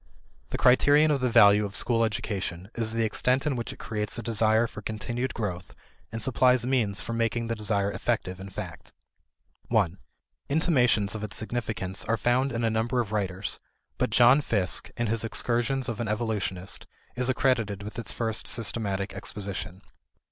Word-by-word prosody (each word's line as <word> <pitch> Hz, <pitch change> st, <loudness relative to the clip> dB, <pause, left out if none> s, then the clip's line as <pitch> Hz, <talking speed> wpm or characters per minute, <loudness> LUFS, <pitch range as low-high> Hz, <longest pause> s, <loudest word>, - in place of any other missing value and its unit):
The -, -, -3 dB
criterion 145 Hz, +4 st, +5 dB
of 140 Hz, -3 st, +1 dB
the 125 Hz, -, +2 dB
value 105 Hz, -2 st, +6 dB
of 100 Hz, -1 st, -5 dB
school 115 Hz, -1 st, +2 dB
education 100 Hz, -3 st, -3 dB
is 115 Hz, -2 st, -1 dB
the 115 Hz, 0 st, +1 dB
extent 125 Hz, +5 st, +1 dB
in 145 Hz, -3 st, 0 dB
which 120 Hz, -1 st, -4 dB
it -, -, -10 dB
creates 105 Hz, -2 st, -3 dB
a 120 Hz, -, -5 dB
desire 110 Hz, 0 st, +2 dB
for 105 Hz, -, -8 dB
continued 120 Hz, +4 st, -3 dB
growth 90 Hz, -6 st, -4 dB, 0.4 s
and 115 Hz, 0 st, -4 dB
supplies 125 Hz, 0 st, +3 dB
means 115 Hz, -7 st, +1 dB
for 115 Hz, -, -5 dB
making 115 Hz, 0 st, 0 dB
the 115 Hz, 0 st, -2 dB
desire 100 Hz, -2 st, 0 dB
effective 95 Hz, -5 st, -2 dB
in 95 Hz, +1 st, -8 dB
fact. 95 Hz, -, -8 dB, 0.7 s
1 100 Hz, -6 st, +1 dB, 0.5 s
Intimations 125 Hz, -, +2 dB
of 110 Hz, -1 st, -5 dB
its 105 Hz, -1 st, -4 dB
significance 110 Hz, -5 st, -3 dB
are 115 Hz, +1 st, +1 dB
found 125 Hz, +4 st, +1 dB
in 115 Hz, -1 st, -2 dB
a 115 Hz, -, +2 dB
number 115 Hz, +3 st, 0 dB
of 110 Hz, -4 st, -2 dB
writers, 100 Hz, -2 st, -2 dB, 0.4 s
but -, -, +1 dB
John 125 Hz, +4 st, +6 dB
Fiske, 100 Hz, -9 st, 0 dB
in 120 Hz, -, 0 dB
his 115 Hz, 0 st, 0 dB
Excursions 120 Hz, +3 st, -1 dB
of 115 Hz, -4 st, -4 dB
an 120 Hz, -, -2 dB
Evolutionist, 105 Hz, -4 st, -2 dB, 0.3 s
is 125 Hz, +1 st, +1 dB
accredited 115 Hz, -6 st, +1 dB
with 105 Hz, +3 st, -7 dB
its 115 Hz, -, -3 dB
first 110 Hz, -2 st, -2 dB
systematic 100 Hz, -3 st, -1 dB
exposition. 95 Hz, -2 st, -6 dB
115 Hz, 170 wpm, -27 LUFS, 100-120 Hz, 0.7 s, value